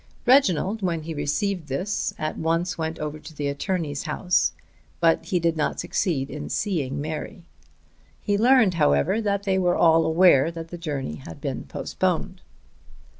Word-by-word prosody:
Reginald 220 - +3
when 170 -4 -1
he 165 +1 -5
received 160 +4 -2
this 180 +10 -2
at 155 0 -3
once 165 +2 -1
went 160 0 -3
over 150 0 -5
to 155 +1 -12
the 145 -1 -2
attorney's 145 0 -2
house, 155 - +1 0.5
but 165 -1 +3
he 180 - 0
did 165 -1 +1
not 155 - -1
succeed 170 -5 -1
in 150 +1 -6
seeing 145 -9 -1
Mary. 155 +3 -5 0.8
He 205 - 0
learned, 230 -2 +5
however, 70 - +2
that 200 -2 -1
they 190 -1 +1
were 180 -1 +2
all 165 -1 +5
aware 160 -3 +5
that 165 -1 -8
the 175 - -7
journey 140 - -4
had 80 0 -10
been - - -4
postponed. - - -2
165 Hz, 160 wpm, -24 LUFS, 150-185 Hz, 0.8 s, learned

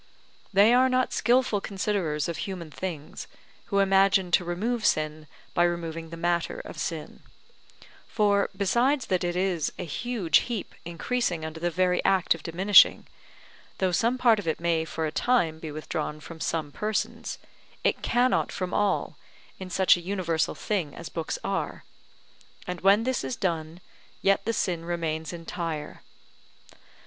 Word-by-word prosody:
They 205 +4 +6
are 255 +1 +5
not 255 0 +1
skilful 240 -3 +2
considerers 190 -7 -1
of 170 -2 -3
human 175 -4 -5
things, 160 -3 -6 0.4
who 200 - -2
imagine 195 -1 +4
to 180 - +4
remove 215 +7 -2
sin 155 -3 0 0.3
by 175 - +3
removing 165 -1 -3
the 165 - -8
matter 170 0 -1
of - - -10
sin; - - -5 0.9
for, 205 -2 +2
besides 240 +8 +2
that 185 -2 0
it 175 0 -1
is 180 -4 0
a - - -4
huge 200 - +1
heap 225 -6 -4
increasing 175 0 -2
under 160 0 -6
the 175 +1 0
very 180 +1 +1
act 190 -2 +3
of 165 - -10
diminishing, 190 +5 +5 0.7
though 185 -1 +1
some 230 +8 +1
part 235 -4 +4
of 195 - -6
it 160 - 0
may 165 -1 +1
for 160 0 -3
a 155 - -2
time 170 -8 +1
be 160 -1 -6
withdrawn 155 0 -4
from 160 +2 -10
some 160 -2 -2
persons, 215 +6 -3 0.5
it - - +1
cannot 250 +1 +2
from 185 0 -4
all, 205 -2 0 0.4
in 185 -1 -7
such 190 +1 +5
a - - -7
universal 175 -3 -1
thing 180 -9 -2
as 170 - -8
books 165 -2 -3
are; 195 0 -3 0.8
and 180 -1 -5
when 200 +4 +5
this 260 +1 -1
is 255 - -3
done, 165 -4 -2 0.4
yet 195 0 +3
the 230 - 0
sin 175 -5 -1
remains 160 -2 -3
entire. 165 -2 -5
180 Hz, 155 wpm, -27 LUFS, 165-205 Hz, 0.9 s, They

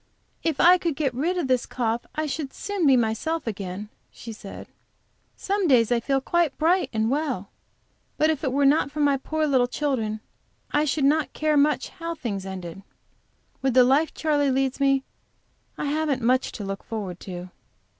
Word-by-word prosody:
"If 320 -4 -1
I 360 +1 +7
could 335 -4 -1
get 275 -4 -1
rid 330 +9 -1
of 335 -6 -1
this 255 -2 +1
cough 235 -1 -2
I 310 - -1
should 290 -1 -4
soon 400 -6 -1
be 265 -2 +6
myself 240 +8 -1
again," 200 -2 -5 0.2
she 230 - -9
said. 200 -2 -9 0.7
"Some 395 -1 -1
days 245 -5 +4
I 240 - +3
feel 270 +3 0
quite 335 +1 0
bright 350 +4 +2
and 220 +1 0
well. 270 -9 -2 0.7
But 310 +1 +3
if 310 -1 -4
it 265 - 0
were 280 +2 +2
not 285 +1 +4
for 300 +2 -7
my 285 -1 +4
poor 310 +3 -1
little 260 -4 +3
children, 245 -6 -2 0.5
I 295 +1 +2
should 285 0 +1
not 305 +2 +2
care 310 0 +1
much 295 +1 +2
how 335 -1 -6
the - - -30
thing 205 -6 -3
ended. 190 -1 -7 0.8
With 265 -2 0
the 255 - +8
life 275 +6 +3
Charley 290 -3 +1
leads 265 0 0
me, 275 -1 +3 0.7
I - - -3
haven't 290 -3 0
much 255 +2 +2
to 210 - -6
look 195 0 -5
forward 195 -6 -5
to." 180 -1 -8
275 Hz, 185 wpm, -25 LUFS, 230-310 Hz, 0.8 s, the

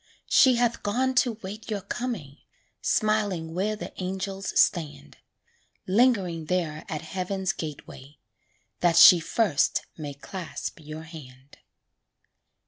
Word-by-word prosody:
She 260 -2 +6
hath 235 -1 0
gone 255 +6 0
to 245 -2 +3
'wait 205 +4 -8
your 210 -2 -2
coming, 190 - -5 0.4
Smiling 205 -7 0
where 200 +5 -1
the 210 - -8
angels 195 +1 -3
stand; 150 - 0 0.7
Lingering 190 -6 +2
there 155 -3 -2
at 155 - -4
heaven's 190 0 -2
gateway, 145 -2 -9 0.6
That 170 -1 +2
she 175 +1 +10
first 170 - +1
may 145 -3 -6
clasp 170 +4 -7
your 155 +1 -8
hand. 140 -5 -13
185 Hz, 115 wpm, -26 LUFS, 155-215 Hz, 0.7 s, she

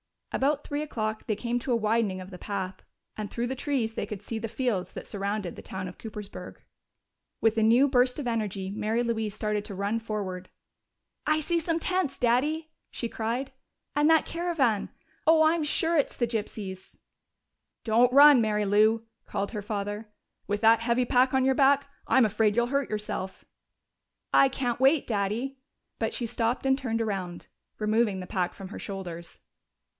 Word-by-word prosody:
About 285 +2 +1
three 290 +1 -3
o'clock 215 -7 -3
they 215 - +1
came 240 +3 -2
to 245 +1 -1
a - - +4
widening 215 -4 +1
of 185 +2 -10
the 180 - -9
path, 190 -2 -4 0.4
and 210 -1 -4
through 235 +1 -2
the 265 - -3
trees 255 -5 -1
they - - -3
could 210 -2 -7
see 220 +2 -4
the 225 - -3
fields 220 -6 -2
that - - -7
surrounded 200 -2 -3
the - - -7
town 190 -1 -6
of 180 - -13
Coopersburg. 210 -2 -8 0.9
With 225 0 +3
a - - +3
new 240 +5 +5
burst 250 -2 +3
of 290 - -4
energy 210 -5 -2
Mary 220 +3 0
Louise 220 -3 -2
started 210 -1 -1
to 200 - -7
run 200 +4 -1
forward. 195 -5 -5 0.8
"I 310 0 +3
see 340 +2 +1
some 330 0 -1
tents, 365 -5 -1
Daddy!" 295 +7 +1 0.2
she 235 - -3
cried. 235 +5 -3 0.4
"And 295 +1 +3
that 320 -1 +5
caravan! 320 - 0 0.4
Oh, 320 0 +6
I'm 315 +1 +3
sure 325 +3 +1
it's 285 - +1
the 240 - +2
gypsies." 210 -4 -5 0.9
"Don't 235 +2 +4
run, 285 -2 +9
Mary 210 -1 +1
Lou!" 215 +3 +3 0.2
called 200 0 -3
her 210 -3 -4
father. 205 +1 -4 0.4
"With 205 +1 -1
that 225 0 +6
heavy 235 +2 +1
pack 255 +2 +3
on 265 0 +3
your 265 0 +3
back! 280 +1 +4 0.2
I'm 260 -3 +5
afraid 215 0 +2
you'll 240 0 +2
hurt 275 +1 0
yourself." 210 -3 -4 0.9
"I 275 - +7
can't 245 -3 -2
wait, 270 +3 +4
Daddy." 225 +6 -2 0.4
But - - -1
she 240 - -1
stopped 230 +3 -1
and 265 0 +3
turned 230 -4 -2
around, 190 -5 -3 0.3
removing 215 -2 +1
the - - -6
pack 180 -1 -1
from 195 -2 -9
her - - -8
shoulders. 175 -4 -7
225 Hz, 180 wpm, -28 LUFS, 205-265 Hz, 0.9 s, run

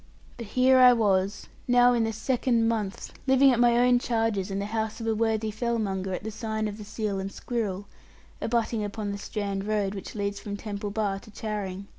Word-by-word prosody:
But 235 -3 -7
here 255 +3 +4
I 250 -1 +9
was, 200 -3 +1 0.2
now 245 0 +5
in 235 -2 +2
the 225 - -1
second 235 +1 +1
month 215 -4 -3
living 265 +1 +6
at 240 - +1
my 240 -1 +5
own 245 0 +4
charges 225 -5 0
in 195 - -3
the 200 - -2
house 220 +1 -3
of 225 - -5
a 225 - +1
worthy 220 0 0
fellmonger 210 -4 -2
at - - -7
the 220 - -4
sign 220 0 -3
of 210 +1 -6
the - - -7
Seal 205 -1 -3
and 195 +1 -4
Squirrel, 205 -5 -3 0.6
abutting 230 -1 0
upon 205 0 -4
the 200 - -5
Strand 200 -1 -3
road 205 -2 0
which 195 +1 -8
leads 200 -1 -2
from 205 -1 -5
Temple 205 -1 -5
Bar 200 -2 -1
to 215 - -16
Charing. 205 -3 -5
215 Hz, 205 wpm, -27 LUFS, 200-235 Hz, 0.6 s, I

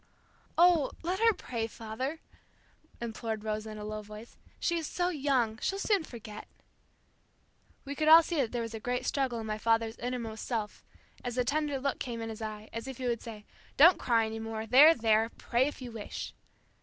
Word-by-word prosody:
"Oh, 340 -4 +5
let 360 +3 -1
her 455 0 +6
pray, 235 - -4
father," 245 +8 -5 0.8
implored 225 -2 -4
Rosa 215 0 -3
in 215 - -7
a 210 - -6
low 215 0 -4
voice. 210 +2 -11 0.2
"She 340 -1 +1
is 320 - -4
so 355 0 0
young, 265 -8 0
she'll 390 - -1
soon 400 -2 +1
forget." 220 -6 -9 1.4
We 280 - -4
could 310 +2 -1
all 325 +1 +10
see 335 0 -3
that 255 -6 +1
there 240 -1 -2
was 230 0 -6
a 225 - -5
great 245 +3 -2
struggle 260 -4 0
in 220 - -5
my 215 0 -3
father's 225 0 +1
innermost 235 -3 -4
self, 220 -4 -3 0.4
as 245 0 -4
a 250 - +2
tender 295 0 0
look 275 +1 -2
came 235 -2 -4
in 225 0 -4
his 220 0 -7
eye, 215 0 -6
as 230 +3 -5
if 265 -2 -6
he 255 - -5
would 235 -2 0
say, 215 -3 -9 0.3
"Don't 340 +6 +8
cry 230 -2 +2
any 220 0 -5
more. 225 0 -4
There, 280 +8 +8
there! 225 -1 +2
Pray 245 +3 +1
if 290 -3 -6
you 245 - -7
wish." 220 -2 -6
235 Hz, 200 wpm, -30 LUFS, 220-280 Hz, 1.4 s, all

